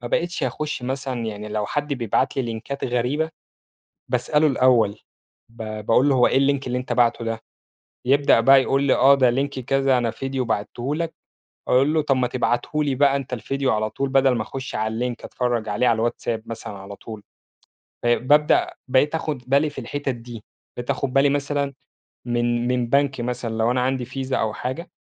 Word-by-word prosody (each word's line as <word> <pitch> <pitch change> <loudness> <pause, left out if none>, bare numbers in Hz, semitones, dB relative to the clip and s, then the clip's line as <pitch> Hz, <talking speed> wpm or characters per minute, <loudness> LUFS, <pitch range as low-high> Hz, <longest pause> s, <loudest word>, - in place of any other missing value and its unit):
ما 120 - -5
بقيتش 170 +6 -1
أخش 150 -4 -3
مثلًا 130 -1 -3
يعني 105 -1 -5
لو 105 -1 -2
حد 145 +3 -2
بيبعت 120 -6 0
لي 135 - +1
لينكات 120 +4 -5
غريبة، 130 +6 0 0.8
باسأله 135 +5 +2
الأول 125 -7 +3 0.5
ب 115 0 -10 0.2
باقول 130 +5 +4
له: 140 - +3
"هو 125 -2 +5
إيه - - +3
الLink 140 0 +2
اللي 125 0 -1
أنت 125 - -4
باعته 120 -1 +2
ده،" 115 0 -3 0.7
يبدأ 140 -1 +4
بقى 135 +3 +7
يقول 135 +1 +1
لي: 140 - +4
"آه 135 +3 +6
ده 130 -3 +4
Link 135 +3 0
كذا، 135 +1 +2
أنا 120 -2 0
فيديو 135 +2 -3
بعتّه 120 +5 -2
لك،" 165 0 -3 0.6
أقول 135 +5 +3
له: 155 - +3
"طب 140 -2 +1
ما 125 -1 +1
تبعته 130 +5 0
لي 140 -2 0
بقى 140 +1 +3
أنت 135 -2 -6
الفيديو 135 +2 -1
على 110 0 0
طول 140 +4 -2
بدل 135 -1 +3
ما 115 - -1
أخش 130 +4 -7
على 110 +3 -1
الLink - - -18
أتفرَّج 120 -3 -2
عليه 105 +4 +1
على 115 - +3
الواتساب 115 0 -2
مثلًا 115 -2 -7
على 100 +1 -9
طول،" 110 -1 -9 0.8
آآ 120 0 +4
بابدأ 150 +5 +3
بقيت 135 +4 +2
آخد 155 -5 -3
بالي 140 +3 +3
في 145 -2 -8
الحتت 145 +4 -4
دي، 115 -2 -10 0.3
بقيت 120 +1 -6
آخد 140 -2 -1
بالي 140 +1 +4
مثلًا، 140 0 -1 0.5
من 120 0 0
من 125 -1 0
بنك 140 -1 +2
مثلًا 125 0 -3
لو 115 +2 +2
أنا 125 0 +1
عندي 130 -1 0
فيزا 130 +1 -3
أو 110 -1 -1
حاجة، 130 +11 -5
130 Hz, 190 wpm, -23 LUFS, 120-140 Hz, 0.8 s, بقى